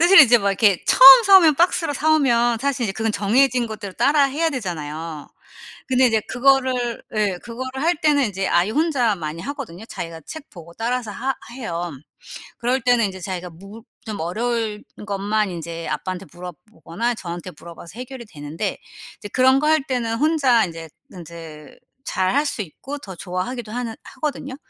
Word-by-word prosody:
사실 355 +4 +8
이제 240 -3 +7
막 200 -2 0
이렇게 195 -1 +2
처음 265 0 +10
사 395 -1 +8
오면 320 -4 +4
박스로 335 -2 +2
사 315 +3 +2
오면 240 -5 +2
사실 275 -2 -1
이제 200 - -2
그건 220 +2 -2
정해진 245 +5 +2
것대로 210 -3 -7
따라해야 290 +3 +2
되잖아요. 160 - -6 0.6
근데 260 0 +4
인제 225 -2 +2
그거를 255 -2 +1
예 205 -4 0
그거를 260 +3 -6
할 340 +2 +2
때는 290 -3 +3
이제 195 -3 -2
아이 175 +4 +2
혼자 265 -6 +1
많이 160 -1 -6
하거든요. 255 - -7
자기가 165 -6 -7
책 315 - -10
보고 170 -3 -13
따라서 235 0 -2
하 265 +5 -2 0.2
해요. 175 -9 -4 0.7
그럴 250 +2 0
때는 245 -2 +3
인제 190 -1 -8
자기가 180 -1 -5
물 195 +7 -13 0.2
좀 215 -2 -6
어려울 220 +4 -2 0.2
것만 205 0 -1
이제 170 -1 -6
아빠한테 185 +5 -4
물어보거나 180 +5 -5
저한테 175 -2 -7
물어봐서 170 +5 -12
해결이 255 -1 -8
되는데 160 +2 -5 0.4
이제 205 - -8
그런 260 +4 +4
거 300 - 0
할 315 -2 +3
때는 245 -4 -2
혼자 275 -5 +3
인제 165 -2 -9 0.2
인제 165 -4 -11 0.3
잘할 255 +11 0
수 220 - -3
있고 270 - -9
더 190 -8 -10
좋아하기도 200 +7 -5
하는 235 -1 -4
하거든요. 275 -1 -5
225 Hz, 360 characters per minute, -21 LUFS, 180-260 Hz, 0.7 s, 처음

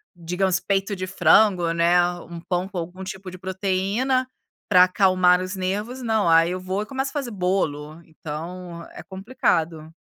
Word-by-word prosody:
digamos 180 +2 0
peito 195 +1 -1
de 185 -1 -4
frango, 185 -2 +3
né, 170 +1 +3 0.2
1 170 -1 -9
pão 180 +1 -2
com 195 - -7
algum 180 +2 -6
tipo 190 0 -7
de 185 - -10
proteína, 195 +8 -1 0.4
para 180 0 +7
acalmar 185 -1 +4
os 185 +2 -5
nervos, 205 +7 -3
não, 220 -5 +1
aí 165 +1 +5
eu 185 - -3
vou 185 +2 -3
e - - -4
começo 265 +4 -3
a - - -19
fazer 275 -5 -3
bolo, 170 -5 -2
então 170 +2 -8
é - - -10
complicado. 170 -6 -2
185 Hz, 165 wpm, -23 LUFS, 170-195 Hz, 0.4 s, para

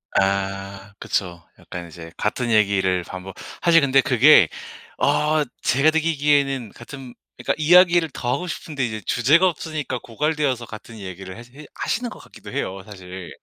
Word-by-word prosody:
아 95 0 -1
그쵸. 85 -3 -3 0.2
약간 85 -1 -8
이제 80 0 -11
같은 120 +3 -2
얘기를 95 -4 +2
반복. 95 +2 -9 0.3
사실 165 -1 +5
근데 135 -1 +4
그게 130 - +6 0.5
어 150 0 +2 0.2
제가 140 +5 +3
느끼기에는 145 -6 +1
같은 130 +1 -11 0.2
그니까 - - -1
이야기를 175 +1 +5
더 120 0 -1
하고 180 +7 -3
싶은데 150 -4 -4
이제 110 -2 -4
주제가 150 +10 +4
없으니까 155 -5 -5
고갈되어서 145 -1 -1
같은 110 +1 -11
얘기를 95 0 -8
해 - - -9 0.2
해 - - -12
하시는 240 +1 -2
것 - - -11
같기도 - - -13
해요, 95 +1 -4
사실. 95 -3 -10
120 Hz, 335 characters per minute, -22 LUFS, 95-150 Hz, 0.5 s, 그게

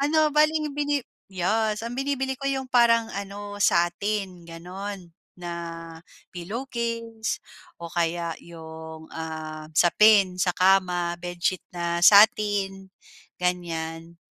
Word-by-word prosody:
ano 305 +1 +3
bale 305 +1 +4
ang 305 -2 -2
bini 290 -2 -1 0.2
yes, 210 +4 0
ang 235 - -4
binibili 265 0 -1
ko 275 +1 -3
'yung 265 -1 -1
parang 235 -2 +3
ano 205 +1 -6
satin 180 0 0
gano'n, 185 +3 -7 0.3
na 175 -1 -6 0.8
pillowcase 230 +3 -4 0.4
o 170 -1 -9
kaya 170 0 -1
'yong, 160 -1 -10
ah, 155 -1 -6
sapin 190 0 +5
sa 180 -1 +1
kama, 180 -2 +2
bedsheet 175 +1 -2 0.2
na 170 0 -1
satin 200 -1 +5 0.5
ganiyan. 170 -2 -3
195 Hz, 110 wpm, -25 LUFS, 170-230 Hz, 0.8 s, sapin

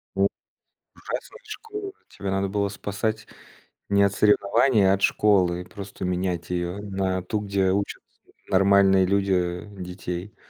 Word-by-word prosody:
У - - +4 0.7
ужасная - - -7
школа. 415 -3 -7 0.2
Тебя 100 -1 -5
надо 95 0 0
было 100 0 0
спасать 105 +2 -3 0.6
не 100 0 +4
от 100 -1 +2
соревнований, 105 +1 +3
а - - +5
от 100 - -1
школы. 90 -4 +2
Просто 95 0 -8
менять 90 -1 -2
её. 90 +2 -2
На 95 -2 -2
ту, 105 +4 -2
где 100 -2 +1
учат 100 +1 -2 0.5
нормальные 95 0 +5
люди 90 -2 0 0.2
детей. 90 +2 -6
95 Hz, 130 wpm, -25 LUFS, 90-100 Hz, 0.7 s, а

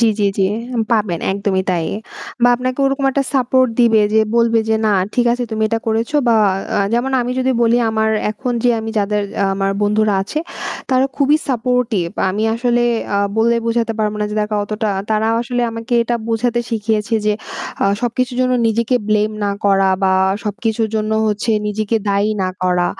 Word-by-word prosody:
জি, 230 - +5
জি, 205 - +2
জি, 195 - +3 0.5
পাবেন 205 -7 0
একদমই 195 -1 0
তাই 170 -3 0 0.6
বা 245 - +6
আপনাকে 255 +1 -3
ওরকম 275 0 -1
একটা 275 +1 0
সাপোর্ট 255 0 +3
দিবে 225 -2 +5
যে 220 - +5 0.2
বলবে 230 -1 +3
যে 220 - +3
না 210 - +3 0.2
ঠিক 245 -1 +2
আছে 245 0 -2
তুমি 220 0 -2
এটা 225 +1 0
করেছো 225 +6 0
বা 230 - +4 0.4
আ - - +2 0.2
যেমন 250 +3 0
আমি 245 0 -2
যদি 260 0 +1
বলি 235 0 +3
আমার 220 0 +1 0.2
এখন 245 +4 -3
যে 245 - +5
আমি 225 0 -5
যাদের 210 0 0 0.2
আ - - +3
আমার 195 0 0
বন্ধুরা 210 0 +2
আছে 205 +10 -4 0.5
তারা 260 +1 +3
খুবই 285 +1 +3
সাপোর্টিভ। 250 -6 0 0.2
আমি 210 +3 -2
আসলে 240 0 +1 0.3
আ - - +2 0.2
বলে 235 +1 +3
বোঝাতে 230 0 0
পারব 210 -1 0
না 210 - +1
যে - - -4
দেখা 210 0 -1
অতটা 215 +1 -2 0.2
তারাও 220 +1 +1
আসলে 245 0 -2
আমাকে 230 +2 -7
এটা 240 +1 -1
বোঝাতে 235 +1 0
শিখিয়েছে 220 0 -1
যে 210 - +3 0.5
আ - - +3 0.2
সবকিছুর 245 +1 -1
জন্য 255 0 +2
নিজেকে 230 +2 +1
ব্লেম 215 0 +2
না 200 - +1
করা 195 -1 +3
বা 190 -1 +3 0.3
সবকিছুর 220 +2 -1
জন্য 215 0 -1 0.2
হচ্ছে 210 +2 -1 0.2
নিজেকে 215 +2 -1
দায়ী 200 +1 +1
না 185 - 0
করা 180 -1 +2
225 Hz, 185 wpm, -17 LUFS, 210-240 Hz, 0.6 s, বা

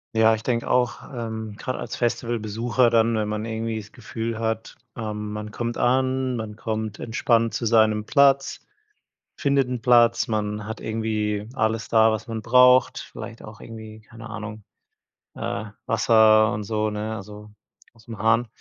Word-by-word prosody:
Ja, 110 0 +5
ich 110 - -2
denke 120 0 -1
auch, 125 -2 +1
ähm, 110 -3 -5
grade 130 +4 -4
als - - -5
Festivalbesucher 120 0 0
dann, 115 0 +3
wenn 110 -1 0
man 105 +1 -3
irgendwie 110 0 -3
das 105 -1 -12
Gefühl 115 0 -5
hat, 110 0 -3 0.2
ähm, 105 -1 -5
man 105 0 -6
kommt 120 +1 -3
an, 130 0 +1
man 110 -2 -5
kommt 110 -1 -4
entspannt 115 0 +1
zu 115 - -1
seinem 110 -1 +3
Platz, 140 -2 +3 0.8
findet 140 -2 +1
'n 125 -2 -4
Platz, 120 0 +4
man 105 -2 -2
hat 110 - -6
irgendwie 110 -1 -2
alles 110 -1 0
da, 110 -1 +4
was 110 0 -4
man 110 -2 -5
braucht, 125 +1 +5
vielleicht 115 -1 -9
auch 110 -1 -12
irgendwie, 110 -1 -10
keine 115 +1 -12
Ahnung, 110 -1 -7 0.7
äh, 100 +1 -3 0.2
Wasser 110 -1 +5
und 105 0 -4
so, 110 +1 -1
ne, 105 +1 -4
also, 105 +1 -10 0.4
ausm 115 -1 -11
Hahn, 115 +3 +2
110 Hz, 160 wpm, -24 LUFS, 110-115 Hz, 0.8 s, Ja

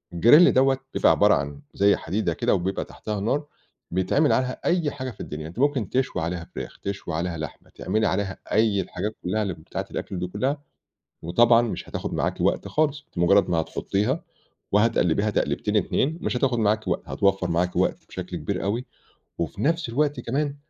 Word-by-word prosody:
الgrill 150 - +7
دوّة 135 +1 +4 0.2
بيبقى - - +4
عبارة - - +5
عن 70 0 -4
زي 100 +1 +4
حديدة 90 0 -1
كده - - +1
وبيبقى 95 +2 -2
تحتيها 105 -1 -5
نار، 140 +9 0 0.5
بيتعمل 95 - +2
عليها 130 0 0
أي 170 -4 +2
حاجة 130 -2 -5
في - - -18
الدنيا 75 +1 -6
أنتِ 85 +8 -9
ممكن 135 -6 +1
تشوي 130 -7 0
عليها 85 +1 -3
فراخ، - - -7
تشوي 100 -3 -5
عليها 85 +1 -2
لحمة، 80 0 -7
تعملي 110 0 0
عليها 95 0 -1
أي 105 -2 +3
الحاجات 105 +4 -4
كُلها 105 +4 0
اللي 95 - -2
بتاعة 80 - -6
الأكل 95 - -4
دي 90 - -2
كُلها 130 +10 -2 0.6
وطبعًا 115 +8 +5
مش 115 - -4
هتاخد - - -4
معاكِ - - -1
وقت - - +1
خالص، 150 -2 0
أنتِ - - -11
بمجرد 100 +3 +4
ما 85 -2 +2
هتحطيها، 105 - -1 0.5
وهتقلبيها 105 -2 +3
تقليبتين - - 0
اتنين 160 +5 +1
مش - - -1
هتاخد 125 -2 +1
معاكِ 110 0 +1
وقت، - - 0
هتوفّر 95 -2 +1
معاكِ 90 +2 0
وقت - - 0
بشكل - - -6
كبير - - -3
أوي 110 +6 -1 0.5
وفي 85 - -3
نفس 165 0 +1
الوقت 145 +2 0
كمان، 140 +4 -2
105 Hz, 180 wpm, -25 LUFS, 90-130 Hz, 0.6 s, الgrill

